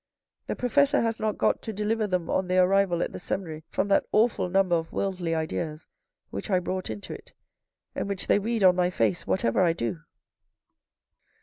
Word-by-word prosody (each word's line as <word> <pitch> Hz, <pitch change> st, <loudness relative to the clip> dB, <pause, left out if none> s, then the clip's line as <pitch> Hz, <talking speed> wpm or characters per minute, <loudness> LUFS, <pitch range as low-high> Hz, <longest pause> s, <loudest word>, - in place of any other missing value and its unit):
The -, -, -2 dB
professor 285 Hz, +3 st, +2 dB
has 230 Hz, -1 st, -1 dB
not 215 Hz, -1 st, -1 dB
got -, -, +1 dB
to 225 Hz, -, -5 dB
deliver 215 Hz, +1 st, -1 dB
them 180 Hz, -3 st, -1 dB
on 190 Hz, -, 0 dB
their 185 Hz, 0 st, +4 dB
arrival 190 Hz, -2 st, +2 dB
at -, -, -4 dB
the -, -, -7 dB
seminary 160 Hz, -4 st, -5 dB
from -, -, -1 dB
that 195 Hz, -, +4 dB
awful 215 Hz, -4 st, +2 dB
number 190 Hz, -1 st, +3 dB
of 165 Hz, -1 st, -3 dB
worldly 180 Hz, -4 st, -2 dB
ideas 160 Hz, 0 st, -3 dB, 0.5 s
which 100 Hz, -, -5 dB
I 190 Hz, -, +3 dB
brought 185 Hz, +1 st, -3 dB
into 105 Hz, -2 st, -6 dB
it, -, -, -12 dB, 0.6 s
and -, -, -3 dB
which 195 Hz, -2 st, -2 dB
they -, -, +3 dB
read 225 Hz, +1 st, -1 dB
on 180 Hz, -1 st, +7 dB
my 180 Hz, 0 st, +2 dB
face 110 Hz, -, 0 dB
whatever 95 Hz, -, +1 dB
I 170 Hz, -2 st, +4 dB
do." 115 Hz, -, -3 dB
185 Hz, 190 wpm, -27 LUFS, 165-205 Hz, 0.6 s, on